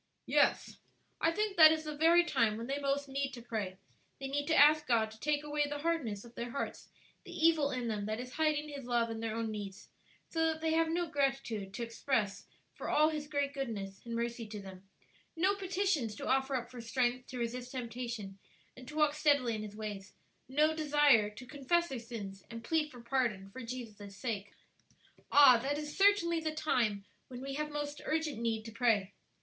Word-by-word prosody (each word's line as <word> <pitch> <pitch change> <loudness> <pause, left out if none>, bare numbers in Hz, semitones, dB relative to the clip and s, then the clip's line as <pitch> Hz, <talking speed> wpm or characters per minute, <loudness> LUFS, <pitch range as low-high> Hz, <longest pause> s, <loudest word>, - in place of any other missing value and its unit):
"Yes; - - +2 0.4
I 325 - +3
think 410 +3 -1
that 315 -1 +10
is 315 0 0
the 305 -1 -5
very 335 +3 +5
time 230 -10 +1
when 230 - -5
they 275 +3 -2
most 280 0 -1
need 275 0 -2
to 240 - -8
pray; 210 -6 -4 0.4
they 270 - -4
need 285 +1 -2
to 320 - +2
ask 300 +1 +6
God 225 -3 +2
to 220 - -14
take 295 +2 0
away 295 0 0
the 290 - -3
hardness 285 -10 -2
of 235 - -14
their 240 +1 -5
hearts; 275 - -5 0.3
the - - -11
evil 320 -3 +3
in 250 -3 -3
them 210 -2 -2
that 215 +1 -2
is 250 0 -7
hiding 305 -1 +1
His 285 -3 -7
love 235 -1 +1
and 225 0 -5
their 225 -1 -2
own 225 -1 -2
needs; 205 -1 -7 0.4
so 325 -1 -1
that 320 0 -1
they 320 0 0
have 325 0 +2
no 345 +2 0
gratitude 270 - -1
to 235 - -3
express 230 -3 -1 0.3
for - - -6
all 305 +1 +4
His 300 -2 -4
great 285 -1 -1
goodness 205 -8 -5
and 235 -1 -5
mercy 235 -1 -3
to 210 0 -7
them, 190 -1 -11 0.5
no 370 +4 +3
petitions 370 - -1
to - - -6
offer 270 +1 +1
up 240 -1 -3
for 245 -2 -8
strength 245 +1 0
to 255 - -7
resist 245 +1 -4
temptation 235 -5 -5 0.4
and 255 - -12
to 300 - -9
walk 300 -1 +3
steadily 285 -6 +2
in 215 - -3
His 210 -1 -7
ways; 210 -2 -6 0.3
no 305 +4 +3
desire 295 -8 +4
to 210 +5 -11
confess 300 +6 0
their 265 -3 -4
sins 205 -5 -7
and 230 0 -8
plead 310 +3 +1
for 245 -4 -12
pardon 235 -6 -1
for 260 - -8
Jesus' 220 -5 -8
sake. 205 -5 -4 0.8
Ah! 270 -5 +8
that 285 +3 -1
is 300 0 -5
certainly 390 -4 +4
the 310 -1 -3
time 230 -10 0 0.2
when 250 -1 -8
we 270 +1 -5
have 300 +2 -2
most 295 0 -4
urgent 310 -5 -1
need 225 -2 -1
to 225 - -7
pray. 215 -4 +1
255 Hz, 205 wpm, -33 LUFS, 225-300 Hz, 0.8 s, that